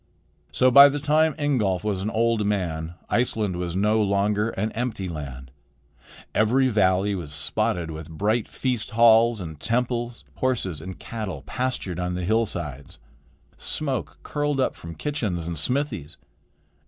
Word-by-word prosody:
So 130 0 +4
by 140 +2 +10
the 145 - -2
time 150 +1 +2
Ingolf 110 -11 +1
was 100 -3 -1
an 105 - -1
old 115 -1 +1
man, 85 -5 -2
Iceland 110 -6 0
was 90 -1 -3
no 105 +3 +2
longer 105 +2 +1
an 110 +1 -2
empty 115 -5 -3
land. 70 -6 -7 0.8
Every 130 +5 +3
valley 100 -2 +2
was 85 -6 -5
spotted 80 +3 -1
with 80 0 -8
bright 105 +8 0
feast 125 -4 -2
halls 115 0 +6
and 80 -5 -7
temples. 120 +1 -1
Horses 100 - -1
and 95 +2 -7
cattle 105 -11 -6
pastured 110 - -3
on 90 0 -2
the 90 -1 -3
hillsides. 85 - -2 0.6
Smoke 130 - -3
curled 145 -1 -1
up 130 - +1
from 85 0 -9
kitchens 105 - -2
and 85 0 -3
smithies. 105 - -2
105 Hz, 140 wpm, -25 LUFS, 90-120 Hz, 0.8 s, by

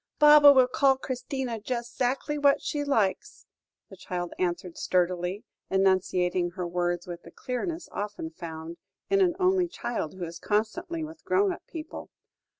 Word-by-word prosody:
"Baba 295 -1 +9
will 260 -2 +5
call 270 0 +3
Christina 260 -2 -4
just 235 +1 -4
'zactly 265 +4 -1
what 285 0 +4
she 295 -1 -2
likes," 220 -9 -1 0.5
the - - -9
child 175 -1 -5
answered 175 -1 -2
sturdily, 180 +2 0 0.3
enunciating 185 -2 +2
her 180 -2 -3
words 175 0 -1
with 175 -1 -7
the - - -13
clearness 320 +7 -4
often 205 -6 -5
found 160 0 -8 0.3
in 395 0 +4
an 355 -3 +3
only 370 -1 +3
child 240 - -4
who 180 -2 -4
is 165 0 -8
constantly 320 - -1
with 315 +1 -9
grown 390 0 +2
up - - -10
people. 320 -1 -8
230 Hz, 150 wpm, -27 LUFS, 180-295 Hz, 0.5 s, Baba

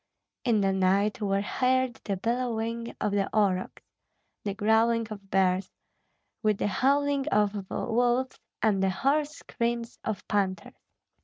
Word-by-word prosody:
In 230 -5 +2
the 195 -1 +2
night 195 +3 +2
were 195 -1 +1
heard 255 +1 +1
the 200 -2 -1
bellowing 230 +1 -2
of 210 - 0
the 200 -1 0
aurochs, 190 -3 0 0.6
the 200 -2 -3
growling 225 +2 +2
of 200 -2 -9
bears, 185 0 +2 0.7
with 215 -2 +2
the - - -1
howling 280 +6 +1
of 205 -2 +1
wolves 245 +2 0 0.2
and 205 -3 +3
the 195 - +3
hoarse 285 +10 +1
screams 235 -5 -3
of 220 -3 -4
panthers. 195 -2 -1
215 Hz, 135 wpm, -28 LUFS, 195-240 Hz, 0.7 s, and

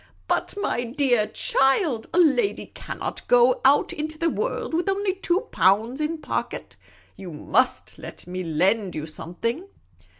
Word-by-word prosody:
" - - -34
But, - - -1
my 245 -11 -1
dear 245 -3 +1
child, 270 - +1
a - - -2
lady 360 +6 +2
can't - - -6
go 245 +1 +4
out 275 +2 +4
into 310 +1 -5
the 330 0 +1
world 475 -6 -3
with 350 +4 0
only 390 0 0
two 375 0 0
pounds 220 +9 +2
in 315 +2 -1
pocket. - - -4 0.4
You 185 -3 -9
must 150 - 0
let - - -10
me 185 +1 -5
lend 185 +5 +1
you 155 0 -4
something." 230 - -4
265 Hz, 155 wpm, -24 LUFS, 205-330 Hz, 0.4 s, go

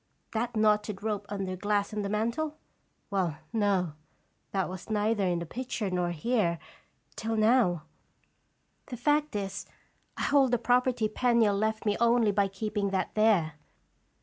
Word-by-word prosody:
That 230 +1 -2
knotted 210 -1 +2
rope 205 -2 -2
under 195 -2 -3
glass 205 +2 0
on 210 - -1
the 200 - -3
mantel? 235 +9 -1 0.5
Well, 180 -6 0 0.2
no; 195 -7 +1 0.6
that 190 -2 -1
was 185 +3 -8
neither 210 -2 +1
in 175 -1 +1
the 170 - -4
picture 235 0 -4
nor 180 -1 0
here, 175 0 0 0.6
till 225 +1 -2
now; 215 -7 +3 1.0
the 245 - -6
fact 295 0 +1
is, 200 0 -4 0.5
I - - -2
hold 275 -2 +4
the - - +5
property 245 -1 +2
Penniel 230 -2 +2
left 220 +2 -1
me 205 -1 +1
only 235 -2 +4
by 200 0 +2
keeping 200 +1 -2
that 190 -1 -1
there. 210 -8 +3
210 Hz, 150 wpm, -29 LUFS, 195-230 Hz, 1.0 s, the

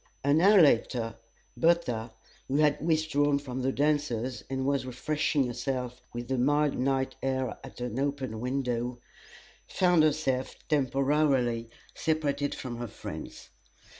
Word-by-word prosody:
An 145 +3 +3
hour 200 +2 +7
later 120 -6 +3 0.4
Bertha, 125 -10 +1 0.4
who 135 - -2
had 150 0 +3
withdrawn 155 -3 +2
from 130 -2 -5
the 130 +1 +1
dancers 140 -4 0
and 130 0 -2
was 140 -1 +1
refreshing 145 +2 0
herself 125 0 -3
with 120 0 -6
the 130 -1 -1
mild 145 +3 +2
night 130 +1 0
air 130 -2 -1
at - - -11
an 125 0 -3
open 135 -5 -2
window, 125 -1 -2 0.7
found 180 -3 +3
herself 150 -4 +1
temporarily 135 -4 +1 0.2
separated 145 -3 -1
from 120 -3 -6
her 120 0 -4
friends. - - -8
135 Hz, 130 wpm, -29 LUFS, 125-150 Hz, 0.7 s, hour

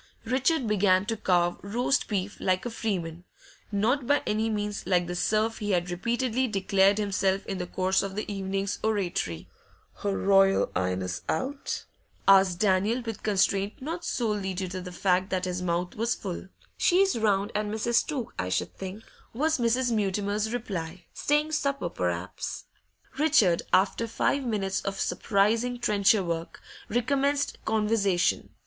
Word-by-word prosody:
Richard 260 +4 +1
began 200 -3 +3
to 225 - -1
carve 175 -4 +1
roast 245 +7 0
beef 200 -1 -2
like 185 +2 0
a 240 - -3
freeman, 175 -7 -3 0.5
not 235 +6 +1
by 285 +1 +3
any 220 +1 0
means 210 -3 -3
like 180 -2 +3
the 175 +1 -4
serf 215 +4 +1
he 210 - -3
had 175 0 0
repeatedly 240 +7 0
declared 195 -1 +3
himself 195 -2 0
in 195 -1 -4
the 180 - -3
course 185 +1 +1
of 195 -1 -5
the 210 - -2
evening's 195 0 -2
oratory. 180 - -1 0.5
'Her 200 -1 -2
Royal 195 0 +4
'Ighness 90 0 -1
out?' 275 - -2 0.4
asked 190 -2 +6
Daniel, 210 +5 +2
with 225 -3 -5
constraint 200 0 +1
not 330 +6 -5
solely 210 - -1
due 185 0 -2
to 185 0 -5
the 180 0 -7
fact 185 +1 +1
that 185 -1 -1
his 180 0 -3
mouth 175 0 -1
was 230 +2 0
full. 190 -1 -6 0.3
'She's 385 +2 +4
round 205 -2 +1
at 210 0 -1
Mrs. 220 +3 +1
Took's, 270 -7 -4
I 90 - -1
should 90 - -2
think,' 195 +3 -7 0.3
was 310 +3 +1
Mrs. 240 +1 +2
Mutimer's 205 0 0
reply. 185 -7 -4
'Staying 295 +1 +1
supper, 280 - -1
per'aps.' 90 +1 -3 0.6
Richard, 250 - +4
after 205 +4 +2
five 275 +4 0
minutes 195 -4 -1
of 195 0 -4
surprising 225 +4 +1
trencher 205 -3 +3
work, 170 -1 -4 0.3
recommenced 280 +5 0
conversation. 210 -4 +1
200 Hz, 150 wpm, -27 LUFS, 185-230 Hz, 0.6 s, asked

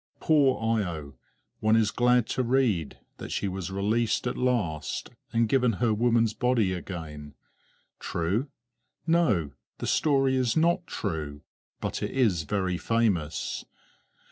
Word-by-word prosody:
Poor 130 -7 +3
Io! 80 -8 -4 0.5
one 110 +1 +3
is 110 -2 +3
glad 125 -1 +3
to 130 - -1
read 120 - +1 0.2
that - - -7
she 100 - -1
was 95 -1 -4
released 105 +6 0
at 125 - -1
last, 115 -12 -1 0.2
and 115 0 +2
given 125 0 +2
her 110 +2 +1
woman's 115 0 +2
body 115 -6 +1
again. 80 -5 -7 0.6
True? 95 - -1 0.6
No, 140 - +2 0.3
the - - -5
story 135 -3 +2
is 125 +1 +1
not 170 +2 +2
true, 75 -7 -4 0.4
but - - -3
it - - -1
is 105 -12 +1
very 95 -2 -1
famous. 105 -10 0
110 Hz, 130 wpm, -27 LUFS, 90-125 Hz, 0.6 s, Poor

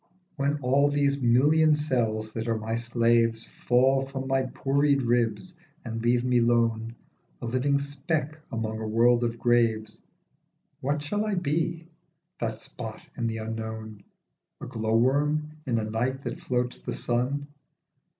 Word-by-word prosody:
WHEN 140 +1 +1
all 140 +3 +4
these 140 -1 +1
million 150 +6 +4
cells 115 -7 -1
that 115 0 -4
are 115 -1 +1
my 110 +1 -3
slaves 115 -1 +1 0.2
Fall 130 +2 +4
from 135 -1 -5
my 135 0 +2
pourried 140 0 +2
ribs 120 - 0 0.3
and 115 -1 -4
leave 120 +1 +2
me 125 -1 +3
lone, 115 -1 +1 0.4
A - - -6
living 130 +4 +1
speck 150 +2 -3
among 110 -2 -3
a 110 - -4
world 120 +2 +4
of 115 0 -1
graves, 115 -3 +1 0.8
What 145 +2 -1
shall 205 +8 -1
I 215 -2 -1
be, 165 0 -1 0.5
that 110 -2 -2
spot 110 0 -8
in 115 -2 -1
the 115 0 -2
unknown? 110 -1 -6 0.6
A - - -7
glow 110 0 0
worm 150 +5 +2 0.2
in 120 -3 +1
a 110 - 0
night 125 +5 -2
that 170 - -4
floats 125 -8 -2
the - - -5
sun? 125 +4 -1
120 Hz, 150 wpm, -27 LUFS, 115-140 Hz, 0.8 s, all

